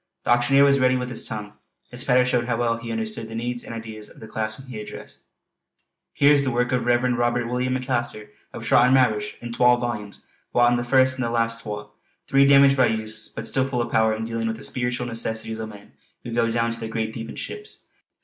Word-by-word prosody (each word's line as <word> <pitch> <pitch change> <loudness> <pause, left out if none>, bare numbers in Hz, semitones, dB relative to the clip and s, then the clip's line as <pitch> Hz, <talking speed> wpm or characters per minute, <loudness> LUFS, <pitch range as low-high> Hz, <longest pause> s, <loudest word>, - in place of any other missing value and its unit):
The - - 0
auctioneer 120 +3 +5
was 140 0 +4
ready 130 0 +3
with 125 0 -4
his 120 - -4
tongue; 105 -1 -6 0.4
his 125 0 -2
patter 125 -1 +4
showed 125 -2 +1
how 120 -2 0
well 115 -1 0
he 115 0 -7
understood 110 0 -2
the 110 - -7
needs 120 +1 -3
and - - -9
ideas 110 -2 -8
of - - -17
the - - -9
class 110 0 -3
whom 135 - -12
he 125 -5 -8
addressed. 105 - -10 0.9
"Here's 145 0 +5
the 135 - -1
works 120 0 0
of 125 - +3
the - - -5
Reverend 120 0 +2
Robert 120 0 +1
William 125 +1 -1
McAlister 120 -4 -3 0.2
of - - -8
Trottermaverish 120 -4 +3
in 120 0 -6
twal 125 0 +4
volumes, 110 -4 -5 0.3
wantin' 120 0 +4
the 120 - -2
first 130 +1 +3
an' - - 0
the 120 - -1
last 115 0 0
twa; 105 -1 -6 0.3
three 140 0 +4
damaged 140 0 +6
by 130 -2 +5
use, 110 0 -3
but - - -6
still 130 0 +1
full 130 -2 -2
of 120 - -2
power 110 0 +3
in 110 +1 -4
dealing 115 0 -3
with 110 0 -2
the - - -11
speeritual 125 -1 -2
necessities 110 -1 -3
o' 110 - -4
men 105 -1 -13 0.3
who 115 - -6
go 115 0 +2
down 115 0 0
to 115 - -4
the 115 - -5
great 110 0 -3
deep 115 -1 -6
in - - -8
ships. 420 0 -7
120 Hz, 235 wpm, -23 LUFS, 110-125 Hz, 0.9 s, damaged